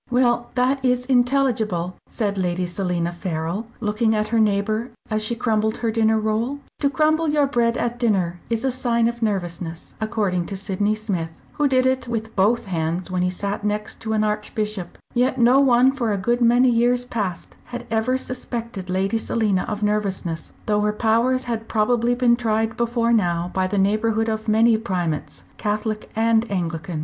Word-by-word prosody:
"Well, 240 -1 +2
that 260 +2 +1
is 250 -1 +1
intelligible," 245 -8 +1 0.2
said 205 -3 -1
Lady 180 -1 -1
Selina 175 -1 -2
Farrell, 175 +4 -3
looking 220 0 +1
at 215 0 -1
her 230 - +2
neighbour, 215 +2 +1 0.2
as 215 0 +1
she 220 +2 -2
crumbled 220 -2 0
her 230 -2 -1
dinner 220 0 +2
roll. 220 +6 -1 0.2
To 280 - +2
crumble 310 +3 +2
your 295 -1 +3
bread 240 -3 +1
at 240 0 -2
dinner 185 -7 +1
is 230 +2 -1
a 265 - +2
sign 235 -2 +1
of 235 0 -4
nervousness, 175 -5 -3
according 205 -6 -1
to 195 - -5
Sydney 205 +2 0
Smith, 195 -7 -3 0.2
who 295 - +1
did 260 -1 +2
it 260 -1 +1
with 225 -1 -4
both 210 +5 +2
hands 175 0 -2
when 180 -1 0
he 180 - +2
sat 200 +3 -4
next 210 +1 -3
an 220 -1 +1
Archbishop; 210 -3 -3 0.2
yet 255 +2 +1
no 245 +2 +5
one 260 -1 +5
for 245 -5 -1
a 205 - 0
good 240 +6 0
many 245 +2 +5
years 245 +1 +2
past 205 -8 -4
had 245 - -7
ever 225 +3 +1
suspected 235 -6 -5
Lady 195 +4 0
Selina 210 -5 0
of 210 -1 -3
nervousness, 195 -5 -2
though 210 -1 +1
her 210 0 +1
powers 235 +4 +2
had 225 -2 -4
probably 235 +2 +2
been 245 -1 +4
tried 225 -1 0
before 235 0 +1
now 175 -5 +1
by 185 0 +1
the 200 +2 -2
neighbourhood 215 +3 +1
of 220 0 -3
many 220 +1 +4
Primates, 175 -8 -3
Catholic 215 +1 -2
and 225 +1 +2
Anglican. 170 -3 -3
220 Hz, 175 wpm, -22 LUFS, 195-240 Hz, 0.2 s, no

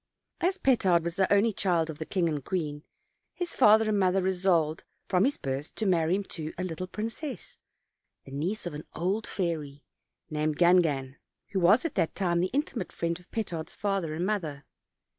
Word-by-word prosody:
As 370 +3 +1
Petard 195 - +3
was 170 0 -2
the 190 0 +1
only 205 +2 +4
child 175 -5 +1
of 150 - -12
the 160 - -5
king 180 -4 +1
and 150 -4 -2
queen, 150 -4 -3 0.5
his 355 -1 -3
father 220 -2 +6
and 210 -1 +2
mother 185 0 +3
resolved 180 -4 +1 0.2
from 185 +1 +3
his 280 - +1
birth 135 +2 -4
to 220 - -2
marry 170 -2 +3
him 200 - -1
to 160 -5 -7
a 180 - -2
little 185 0 -4
princess, 225 - -5 0.7
the - - -12
niece 175 +11 -2
of 175 - -4
an 150 +1 -7
old 195 +6 -1
fairy, 155 -6 -3 0.4
named 150 0 -1
Gangan, 160 -7 +3 0.3
who 195 - -1
was 200 - +5
at 330 - -1
that 170 -4 0
time 175 -3 +1
the 180 +2 +1
intimate 265 - -2
friend 170 0 -2
of 180 - -21
Petard's 170 -8 -4
father 195 -6 -1
and 175 +3 -1
mother. 160 -9 -2
180 Hz, 185 wpm, -28 LUFS, 160-205 Hz, 0.7 s, father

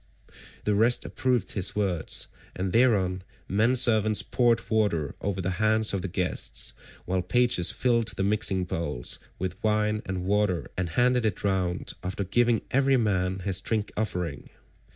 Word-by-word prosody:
The 105 - +1
rest 115 +4 +3
approved 125 -6 -1
his 95 -1 +1
words, 95 -6 -1 0.3
and 95 0 -3
thereon 100 -7 +2 0.3
men 110 +6 +2
servants 110 -4 +4
poured 120 -2 +1
water 100 - 0
over 95 -1 -2
the 95 +1 -1
hands 110 0 +3
of 100 - -1
the 95 - -3
guests, 90 0 -1 0.3
while 90 0 0
pages 120 -5 +2
filled 115 -3 +1
the 95 - -2
mixing 100 -2 +1
bowls 75 -8 -2 0.2
with 95 +3 -5
wine 105 0 +1
and 95 -1 -3
water 100 -2 +1
and 90 -2 -2
handed 125 +7 +2
it 105 -4 -1
round 95 -3 -1
after 95 +2 -3
giving 120 +4 +1
every 135 0 +3
man 95 -4 0
his 95 -3 +1
drink 110 -2 -1
offering. 90 - -3
100 Hz, 150 wpm, -27 LUFS, 90-110 Hz, 0.3 s, servants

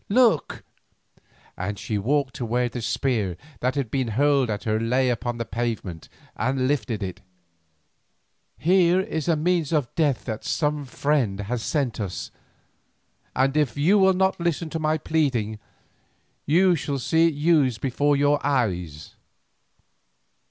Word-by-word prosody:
Look," 225 - +2 0.9
and 100 +3 -4
she 105 +3 -3
walked 135 +4 0
to - - -4
where 120 +2 0
the 120 0 -6
spear 110 -6 -1 0.2
that 125 +2 0
had 135 -6 -2
been 130 -3 0
hurled 135 +2 +2
at 105 -1 -3
her 110 0 0
lay 125 +3 +1
upon 120 0 -3
the 115 - -3
pavement 110 -8 -4 0.3
and 130 +2 0
lifted 125 -7 -1
it, 90 -2 -6 1.4
"here 180 +1 +4
is 180 -6 -3
a 165 - +3
means 165 -1 0
of 145 -6 0
death 145 -6 0
that 110 -3 -4
some 150 -2 -1
friend 125 -7 0
has 115 +4 -3
sent 135 -3 -1
us, 100 -4 -4 1.0
and 135 +2 +2
if 145 -6 +1
you 180 +8 +4
will 190 0 +5
not 190 0 +1
listen 170 -1 -1
to 160 - -3
my 155 0 +1
pleading 130 -9 -1 0.9
you 175 +4 +4
shall 145 -2 -3
see 160 +6 +3
it 160 - -1
used 145 -6 +2
before 145 +2 +1
your 145 +1 +2
eyes. 90 - -1
135 Hz, 145 wpm, -24 LUFS, 115-155 Hz, 1.4 s, will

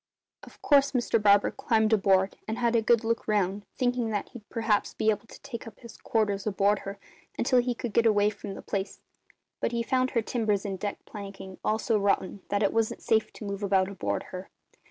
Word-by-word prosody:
"Of - - -15
course 280 -1 +4
Mr 240 -3 +1
Barber 205 -1 +5
climbed 225 -4 +1
aboard 195 -2 +3
and 220 +1 -2
had 235 -1 +1
a 230 - +4
good 230 +1 +3
look 230 +1 -1
round, 205 -1 0
thinking 245 -2 0
that 205 -2 -2
he'd 230 -4 -13
perhaps 225 -3 0
be 220 - +3
able 215 +2 -4
to - - -13
take 240 -5 -7
up 220 - -12
his 235 -2 -12
quarters 205 -3 -1
aboard 200 0 +2
her 195 +1 -7 0.4
until 250 +1 +3
he 245 0 0
could 235 -2 -5
get 230 +2 +4
away 210 -1 +3
from 200 -1 -8
the - - -9
place; 195 0 -3 0.6
but 235 - -1
he 235 0 0
found 255 +1 +1
her 230 -3 0
timbers 215 -4 0
and 195 -2 -3
deck 205 +1 -4
planking 195 -2 -9
all 215 - +1
so 220 -1 +1
rotten 200 -1 0
that 205 +1 +1
it 200 - +2
wasn't 225 -1 0
safe 220 -1 +2
to 215 - -9
move 200 0 -4
about 190 -1 +2
aboard 200 - -2
her. 185 +1 -7
215 Hz, 215 wpm, -28 LUFS, 200-230 Hz, 0.6 s, Barber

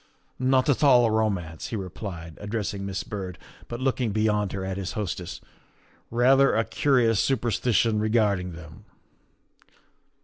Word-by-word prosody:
' - - -39
' - - -40
" - - -43
Not 130 0 +2
at 145 0 +2
all 125 -4 +6
a 115 - +1
romance," 95 -8 -1
he - - -4
replied, 90 -4 -6
addressing 105 -1 -3
Miss 100 0 -3
Byrd, 95 -5 -6 0.3
but 120 - -6
looking 130 -3 0
beyond 105 -1 +1
her 95 -1 -4
at 95 0 -3
his 95 -1 -4
hostess, 90 -4 -4 0.4
" - - -34 0.3
rather 135 +4 +4
a 115 +1 +2
curious 120 -7 +2
superstition 115 -3 +1
regarding 105 -5 +1
them." 80 -1 -12
105 Hz, 160 wpm, -26 LUFS, 95-120 Hz, 0.4 s, all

